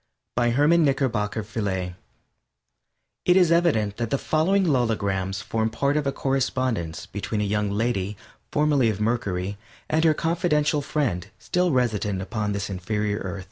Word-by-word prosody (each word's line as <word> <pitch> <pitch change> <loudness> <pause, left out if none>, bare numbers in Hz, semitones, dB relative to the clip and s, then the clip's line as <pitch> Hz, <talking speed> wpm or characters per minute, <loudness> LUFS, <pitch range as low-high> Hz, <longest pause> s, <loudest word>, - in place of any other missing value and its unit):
_ - - -58
BY 120 0 +2
HERMAN 150 +7 +4
KNICKERBOCKER 120 -7 0
VIELÉ 100 -4 -3 1.3
It 180 +1 +5
is 180 -3 +5
evident 145 -13 +2
that 115 -1 -2
the 140 - +1
following 185 +8 +2
logograms 100 - 0
form 110 0 0
part 140 +5 0
of 150 -2 0
a - - +2
correspondence 130 -11 -1
between 105 +1 -4
a - - +1
young 105 0 0
lady, 105 -2 -1 0.3
formerly 145 -5 +3
of 105 -2 -2
Mercury, 100 -4 -1 0.3
and 160 +1 +1
her 160 -2 +4
confidential 155 -3 +1
friend 130 - -1
still 180 0 0
resident 110 -6 0
upon 105 +2 -2
the 100 0 -2
inferior 105 +2 -2
planet. 95 +1 -4
115 Hz, 150 wpm, -25 LUFS, 100-145 Hz, 1.3 s, It